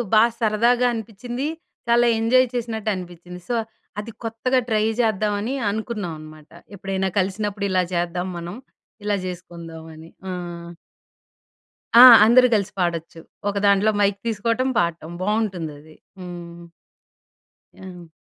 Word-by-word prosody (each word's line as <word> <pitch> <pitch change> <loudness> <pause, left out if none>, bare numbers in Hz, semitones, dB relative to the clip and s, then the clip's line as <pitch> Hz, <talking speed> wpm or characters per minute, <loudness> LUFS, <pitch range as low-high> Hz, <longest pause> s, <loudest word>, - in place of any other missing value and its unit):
బాగా 230 +2 +5
సరదాగా 235 +3 +3
అనిపించింది. 235 +4 -5 0.4
చాలా 240 +1 +4
ఎంజాయ్ 255 +3 +4
చేసినట్టు 225 -3 -3
అనిపించింది. 180 0 -9
సో, 240 - +1 0.4
అది 215 +2 -6
కొత్తగా 230 +3 0
ట్రై 215 -1 +2 0.2
చేద్దామని 215 +1 0 0.2
అనుకున్నాం 215 -4 -4
అనమాట. 155 0 -13 0.3
ఎప్పుడైనా 190 0 -2
కలిసినప్పుడు 200 +2 -2
ఇలా 185 -1 +2
చేద్దాం 175 +1 -1
మనం, 170 +2 -6 0.5
ఇలా 205 -1 +1
చేసుకుందామని. 165 -3 -9 0.2
హ్మ్. 175 -2 -6 1.3
ఆ! - - +12 0.2
అందరూ 250 +3 +6
కలిసి 200 -1 -1
పాడొచ్చు. 170 -2 -2 0.3
ఒకదాంట్లో 200 +1 +3
మైక్ 200 0 +2
తీసుకోవటం 230 +4 0
పాడటం 170 -1 -2
బాగుంటుంది 195 -6 -1
అది. 155 +1 -17 0.2
హ్మ్. 175 -1 -9 1.1
ఆ! 180 -2 -11
200 Hz, 110 wpm, -22 LUFS, 175-225 Hz, 1.3 s, ఆ